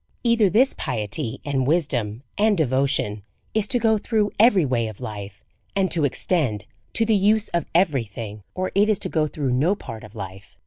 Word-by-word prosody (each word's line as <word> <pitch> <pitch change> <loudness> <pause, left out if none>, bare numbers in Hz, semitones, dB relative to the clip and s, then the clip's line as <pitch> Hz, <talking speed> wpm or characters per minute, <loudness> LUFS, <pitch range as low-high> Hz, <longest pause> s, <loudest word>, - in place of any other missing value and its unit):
Either 235 -4 +4
this 250 +8 +4
piety, 115 +3 -3
and 135 -3 0
wisdom, 130 -8 0
and 210 -1 +3
devotion, 130 -7 0 0.3
is 215 -1 +1
to 245 - +3
go 220 -2 +2
through 210 -1 0
every 205 -7 +5
way 120 -4 0
of 110 -2 -9
life, 105 -4 -7 0.3
and 195 -1 +1
to 160 -4 +2
extend 135 - 0 0.3
to 225 - +1
the 220 -1 +3
use 210 +2 +3
of 170 - -1
every 160 -8 +3
thing, 105 0 -8
or 185 0 -2
it 205 +2 +3
is 215 - +3
to - - -3
go 155 -2 +1
through 145 -3 -2
no 155 +10 +2
part 115 - -9
of 110 - -13
life. 95 -1 -9
150 Hz, 190 wpm, -23 LUFS, -, 0.3 s, every